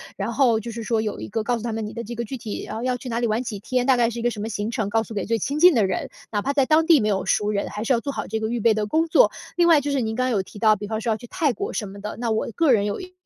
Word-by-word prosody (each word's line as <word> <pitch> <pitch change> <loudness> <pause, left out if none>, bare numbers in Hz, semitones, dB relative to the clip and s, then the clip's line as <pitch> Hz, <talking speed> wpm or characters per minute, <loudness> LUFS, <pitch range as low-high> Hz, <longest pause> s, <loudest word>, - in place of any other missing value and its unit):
然 200 +3 -3
后 235 -3 +3
就 235 +2 -6
是 230 +1 -6
说 225 0 0
有 215 -2 -3
一 - - -6
个 220 +1 -2
告 245 +1 0
诉 225 - -8
他 235 - -2
们 220 -1 -3
你 210 - -7
的 235 - -5
这 240 +3 -6
个 235 - -3
具 260 +4 -6
体， 220 -3 -6
啊， 220 - -5
要 255 0 0
去 250 +1 -8
哪 230 0 -1
里 240 - +1
玩 220 +3 0
几 220 -5 -5
天， 250 +4 -1
大 265 -1 +5
概 235 -1 +3
是 240 - -7
一 - - -3
个 240 +1 +1
什 220 - -7
么 210 - -3
行 210 0 -3
程 220 -4 -2
告 225 +1 +1
诉 225 - -10
给 200 -3 -2
最 230 +1 +1
亲 285 +9 -2
近 355 +2 +8
的 220 -4 +4
人。 185 -2 -2 0.2
哪 205 -2 0
怕 280 +6 -1
在 275 -2 +3
当 315 +3 +4
地 325 -3 +6
没 215 - +1
有 195 -2 0
熟 210 +2 +1
人， 200 -1 -1
还 210 - -5
是 230 - -1
要 235 - +2
做 280 +3 -4
好 - - -4
这 220 +1 -2
个 220 0 -2
预 240 +1 -1
备 225 +1 +4
的 215 0 -1
工 320 +8 +1
作。 - - +5 0.3
另 345 -1 +4
外 325 -4 +6
就 290 +1 -2
是 280 - +1
您 220 -1 -2
刚 255 +1 0
有 215 -6 +1
提 200 - -14
到， 215 -1 +5
比 205 +1 -6
方 220 +1 -3
说 230 - -2
要 215 - 0
去 240 - -12
泰 330 -4 0
国 - - -4
什 210 - -3
么 195 +1 -10
的， 210 +1 -6
那 235 -1 -1
我 220 - 0
个 325 -4 +3
人 210 -4 +3
有 205 - -3
一 365 0 -10
230 Hz, 405 characters per minute, -23 LUFS, 215-255 Hz, 0.3 s, 近